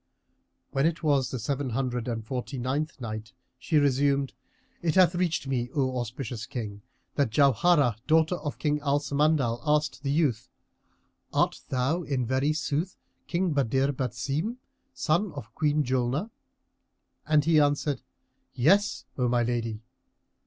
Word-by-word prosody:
When 135 +2 +2
it 165 0 -3
was 140 -5 +2
the 130 - -3
Seven 135 +4 -2
Hundred 125 -1 -2
and 115 -2 -3
Forty 125 +2 -4
ninth 135 +5 -2
Night, 110 -2 -6 0.3
She 155 +4 +1
resumed, 140 -1 +2 0.5
It 165 -3 0
hath 185 -2 +6
reached 175 -4 0
me, 125 -3 -1
O 130 -3 +1
auspicious 120 -1 -5
King, 105 -4 -5 0.3
that 140 -5 +1
Jauharah, 140 0 +4
daughter 160 +2 +4
of 145 -4 -5
King 150 -1 0
Al 145 -1 +1
Samandal, 140 -4 +1
asked 150 -2 +1
the 140 - -2
youth, 140 -6 +1 0.8
"Art - - +1
thou 135 +7 0
in 140 -6 -1
very 130 +5 +1
sooth 155 +3 -2 0.3
King 175 -1 0
Badr 135 0 +2
Basim, 140 - -2 0.3
son 175 -1 0
of 110 +1 -9
Queen 150 -1 +1
Julnar?" 130 - -1 1.0
And 150 -1 +4
he 160 -1 +5
answered, 145 -2 +1 0.5
"Yes, 195 - +3
O 125 - +2
my 120 0 +2
lady!" 115 -2 -2
140 Hz, 140 wpm, -27 LUFS, 125-155 Hz, 1.0 s, hath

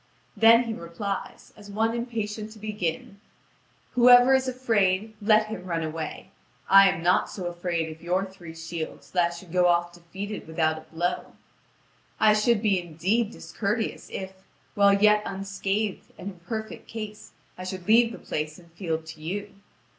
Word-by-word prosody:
Then 230 +1 +7
he 230 -2 -3
replies, 195 +2 -6
as 205 -1 -13
one 220 +3 0
impatient 220 -3 -4
to - - -15
begin: 200 -2 -4 0.7
"Whoever 245 +1 +7
is 265 0 +3
afraid, 220 -5 +1
let 215 +1 +4
him 215 -4 -6
run 170 -3 -2
away! 155 0 -5 0.4
I 195 0 +8
am 165 - -3
not 180 +1 +3
so 185 - -6
afraid 175 -2 -2
of 160 - -23
your 180 +3 0
three 175 -4 -11
shields 165 0 -6
that 175 -2 +2
I - - -8
should 170 0 -12
go 180 0 +4
off 175 0 +2
defeated 190 +4 -7
without 160 -1 0
a 160 - -17
blow. 175 +2 -2 0.9
I 215 -1 +6
should 215 +1 +2
be 195 -4 +2
indeed 180 +7 0
discourteous, 220 0 -3
if, 190 0 -6 0.4
while 200 -1 +5
yet 210 0 +5
unscathed 195 +1 -3
and 190 - -6
in 180 - -17
perfect 220 +4 -6
case, 215 -2 -8 0.2
I 185 - -8
should 185 -1 -6
leave 230 +1 +5
the - - -8
place 155 0 -4
and 170 -1 -18
field 165 -3 -3
to 160 -1 -10
you. 200 +5 -4
195 Hz, 165 wpm, -26 LUFS, 170-215 Hz, 0.9 s, I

